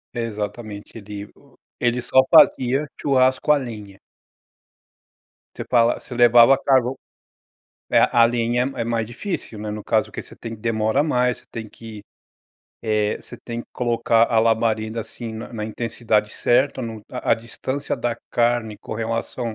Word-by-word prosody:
Exatamente 105 -2 -5
ele 105 -1 -8
o - - -23 0.2
ele 120 0 0
só 130 +2 +4
fazia 130 +3 +5
o - - -14
churrasco 130 +1 +2
a 150 - +5
lenha. 105 -7 -8 1.6
Você - - -5
falav 120 -1 +3
você - - -10
levava 120 +2 +7
carvão 130 -1 +2 0.9
é - - +5
a 115 -1 +6
lenha 120 +2 0
é 120 - -2
mais 115 -1 -1
difícil, 120 - -5
né. 105 - -5
No 105 0 -6
caso 110 -1 +1
que - - -5
você - - -15
tem 115 -1 -7
que, 105 - -19
demora 110 +4 +1
mais, 125 -4 +1
você - - -24
tem 110 -2 -6
que, 110 -2 -11 0.8
eh, 105 -1 0
você - - -12
tem 120 -1 -4
que - - -24
colocar 115 -1 +2
a 115 - +3
labareda, 110 0 +1
assim, 115 +1 -8
na 110 +2 -8
na 110 -2 -4
intensidade 110 -1 -1
certa, 130 +3 +1
no 115 -2 -6
a - - -3
a - - +6
distância 130 +5 -4
da 120 -1 -2
carne 120 -2 +1
com - - -7
relação 115 +1 -3
115 Hz, 165 wpm, -22 LUFS, 110-120 Hz, 1.6 s, levava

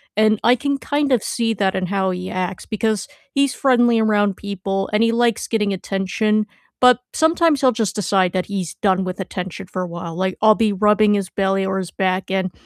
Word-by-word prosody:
and 215 0 +3
I 245 - +5
can 280 +3 -1
kind 285 0 -1
of 245 -4 +3
see 230 -1 -1
that 190 -1 0
in 185 -1 -2
how 190 -1 0
he 180 +1 -5
acts 185 0 -4
because 215 -1 -2 0.3
he's 275 -1 +2
friendly 240 -4 +3
around 205 -3 +1
people 195 -1 -3
and 215 +2 +3
he 230 - +3
likes 235 -1 +1
getting 210 -3 0
attention, 195 +3 -1 0.3
but 250 0 +6
sometimes 320 -2 +2
he'll 260 -2 +4
just 220 -3 -1
decide 190 -2 +1
that 185 -1 -1
he's 190 -5 -4
done 190 -2 +1
with 185 +1 -5
attention 185 0 -6
for 185 0 -4
a 180 - -3
while, 170 -1 -7
like, 185 +1 -2
I'll 215 0 +6
be 220 -2 +1
rubbing 210 +1 +3
his 195 -2 -2
belly 195 0 0
or 190 0 -1
his 185 -2 -4
back 190 0 -1
and 190 -1 -1
200 Hz, 210 wpm, -20 LUFS, 190-225 Hz, 0.3 s, but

